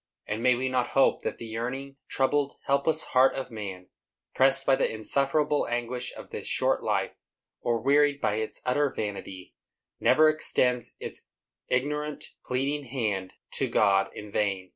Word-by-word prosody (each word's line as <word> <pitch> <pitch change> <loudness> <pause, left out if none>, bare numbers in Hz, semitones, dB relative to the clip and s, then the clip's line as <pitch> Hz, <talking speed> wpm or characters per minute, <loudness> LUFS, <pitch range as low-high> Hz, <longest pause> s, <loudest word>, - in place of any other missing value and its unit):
And 105 +2 -3
may 125 0 +4
we 130 +2 -1
not 130 -1 0
hope 135 - +4
that - - -3
the 115 - -8
yearning, 125 +5 -5
troubled, 140 +1 +1
helpless 140 +3 +2
heart 130 +1 +5
of 130 -1 -5
man, 95 -5 -7 0.4
pressed 135 +1 +3
by 135 - +5
the - - 0
insufferable 140 +6 +1
anguish 120 +1 -2
of - - -11
this - - -5
short - - +1
life, - - 0 0.5
or 120 -1 0
wearied 145 +3 +3
by 105 -4 0
its 110 0 -4
utter 140 +3 +2
vanity, 95 -3 -6 0.5
never 155 0 +5
extends 125 -5 +2
its - - -7 0.5
ignorant, 150 +3 -2
pleading 140 +3 -1
hand 105 -8 -2 0.2
to - - -1
God 100 -1 +3
in 105 -1 -8
vain? 95 -3 -1
125 Hz, 155 wpm, -27 LUFS, 110-140 Hz, 0.5 s, heart